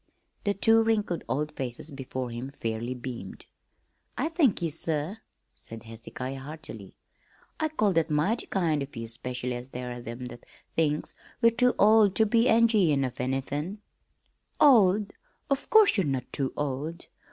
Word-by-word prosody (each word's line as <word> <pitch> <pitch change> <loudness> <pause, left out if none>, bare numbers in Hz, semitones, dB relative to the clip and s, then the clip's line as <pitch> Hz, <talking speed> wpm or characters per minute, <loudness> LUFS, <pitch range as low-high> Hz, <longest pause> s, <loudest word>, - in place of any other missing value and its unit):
The 200 0 +1
two 225 +3 +5
wrinkled 215 -6 0
old 150 +2 -1
faces 130 +1 -6
before 130 -2 -5
him 120 +3 -5
fairly 115 -2 -4
beamed. 120 -6 -7 0.7
"I 300 +5 0
thank 310 - +2
ye, 165 - 0
sir," 160 +5 -2 0.3
said 115 -1 -10
Hezekiah 120 +4 -7
heartily. 155 +4 -9 0.6
"I 315 0 +1
call 215 -10 +1
that 165 -1 +1
mighty 155 +10 +1
kind 165 -6 0
of 140 0 -7
ye, 115 0 -5
specially 125 +2 -4
as 120 +1 -6
there 125 -1 -5
are 120 0 -6
them 120 +2 -7
that 120 -1 -10 0.3
thinks 150 -2 0 0.3
we're 230 -1 +5
too 250 +2 +2
old 210 -2 +5
ter 220 - +5
be 230 +2 +3
enj'yin' 210 - +4
of 125 0 -5
anythin'." 135 +8 -2 0.8
"Old? 210 -8 +5 0.4
Of 275 - 0
course 440 - +6
you're 190 -6 +1
not 130 -3 -3
too 135 -2 -1
old! 150 +4 -3
150 Hz, 155 wpm, -28 LUFS, 125-210 Hz, 0.8 s, course